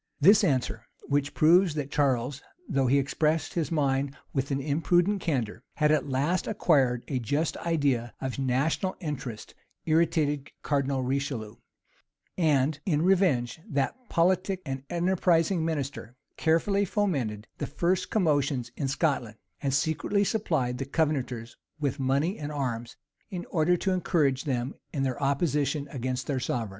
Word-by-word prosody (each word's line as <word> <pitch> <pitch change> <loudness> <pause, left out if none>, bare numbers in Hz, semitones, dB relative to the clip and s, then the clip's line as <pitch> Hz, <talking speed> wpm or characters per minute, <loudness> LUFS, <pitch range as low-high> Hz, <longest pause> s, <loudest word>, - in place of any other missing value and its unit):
[] - - -49
This 210 +1 +6
answer, 120 - 0 0.2
which 145 0 0
proves 170 +1 +5
that 145 -2 -3
Charles 135 -1 +1 0.3
though 135 -1 +1
he 135 +3 +4
expressed 155 +3 0
his 170 -1 -1
mind 140 -3 0 0.2
with 135 -1 -1
an 140 -1 0
imprudent 175 +7 +1
candor, 120 -9 -2
had 150 -1 +3
at 155 -2 +1
last 145 +8 0
acquired 135 - +2
a 130 - -1
just 145 +7 -1
idea 140 -8 0
of 130 0 -4
national 135 +8 0
interest 135 - -5 0.3
irritated 155 -3 +1
Cardinal 140 -2 0
Richelieu; 130 -5 -2 0.8
and, 150 -3 +2
in 155 -4 +1
revenge, 165 -9 +2
that 140 -2 0 0.2
politic 185 +2 +1
and 135 -2 -4
enterprising 175 -1 +2
minister 140 -7 -3 0.2
carefully 170 +5 +2
fomented 140 - -1
the - - -2
first 175 +5 0
commotions 145 - +1
in 140 - -2
Scotland, 135 -6 0 0.2
and 140 - 0
secretly 160 +8 +1
supplied 155 - 0
the 135 - -2
Covenanters 130 -6 -1 0.2
with 140 -1 -1
money 140 +9 +1
and 150 0 -4
arms, 120 -5 -3 0.3
in 180 -4 -5
order 175 +1 +3
to 190 - -1
encourage 155 -7 +1
them 130 -1 -1 0.2
in 140 -3 -1
their 130 0 -2
opposition 140 0 0
against 130 -1 -3
their 140 -3 -1
sovereign. 115 -3 -2
145 Hz, 145 wpm, -28 LUFS, 130-165 Hz, 0.8 s, This